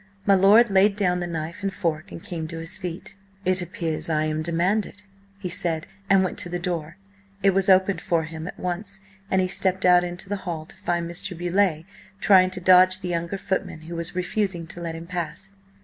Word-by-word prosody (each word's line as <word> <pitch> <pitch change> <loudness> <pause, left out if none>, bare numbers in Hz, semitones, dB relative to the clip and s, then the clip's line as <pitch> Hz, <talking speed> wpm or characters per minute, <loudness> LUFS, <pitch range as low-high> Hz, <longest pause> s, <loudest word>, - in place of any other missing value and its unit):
My 200 - +5
lord 205 +4 +6
laid 195 +1 +4
down 180 -3 +1
the 175 - -3
knife 165 +3 -5
and 195 -1 -1
fork 160 -4 -3
and 165 - -9
came 165 -3 -5
to 165 0 -7
his 165 +4 -2
feet. 185 +1 -7 0.3
"It 185 0 +3
appears 165 -2 -3
I 155 -1 +1
am 155 0 -1
demanded," 185 +6 -1 0.3
he 200 -2 -5
said, 165 -2 +1 0.2
and 195 -1 +5
went 185 - -2
to 175 - -3
the 175 - -2
door. 170 -2 -4 0.5
It 195 - +6
was 195 +1 +1
opened 190 +1 +4
for 165 -2 +1
him 160 +1 -7
at - - -8
once, 180 +2 -4 0.3
and 190 - +2
he 185 - +1
stepped 190 0 0
out 180 0 +6
into 175 +1 -4
the 205 +1 -2
hall 170 -5 -5
to - - -15
find 170 -1 -2
Mr. 175 +1 -3
Beauleigh 175 -2 +1 0.3
trying 185 -3 +5
to 185 0 -3
dodge 185 +1 +5
the 180 - -4
younger 170 +2 -2
footman, 190 -4 -3
who 165 +2 -8
was 170 +1 -2
refusing 185 -1 -1
to 175 +1 -8
let 165 -1 -4
him 165 +1 -8
pass. 175 +1 -3
180 Hz, 210 wpm, -24 LUFS, 170-190 Hz, 0.5 s, lord